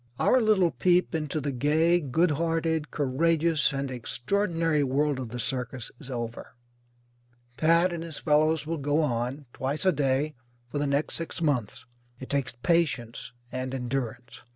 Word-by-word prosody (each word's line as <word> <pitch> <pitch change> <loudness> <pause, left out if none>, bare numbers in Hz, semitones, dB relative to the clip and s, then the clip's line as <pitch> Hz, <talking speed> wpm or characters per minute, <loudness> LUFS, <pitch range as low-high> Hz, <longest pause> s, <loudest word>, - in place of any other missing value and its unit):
Our 255 - +4
little 200 -6 +3
peep 180 0 +2
into 155 -1 -2
the 140 0 -2
gay, 155 +6 +3
good 160 +3 +1
hearted, 160 0 0
courageous, 155 +2 +2
and 135 -1 -3
extraordinary 165 - 0
world 140 +1 +1
of 125 -3 -5
the 125 +2 -6
circus 125 -1 -3
is 140 -4 -10
over. 120 0 -5 1.0
Pat 170 +4 +3
and 170 - -4
his 165 -2 -7
fellows 155 +1 +2
will 165 0 -3
go 145 +3 +1
on, 125 +2 -2
twice 140 +6 -2
a 185 - +6
day, 140 0 0 0.3
for 145 +4 -3
the 145 - 0
next 140 +2 0
six 165 - -3
months. 125 -8 -1 0.3
It 130 - -8
takes 140 -3 -1
patience 130 -11 0 0.2
and 130 +1 -3
endurance. 125 -2 -4
145 Hz, 155 wpm, -27 LUFS, 130-165 Hz, 1.0 s, a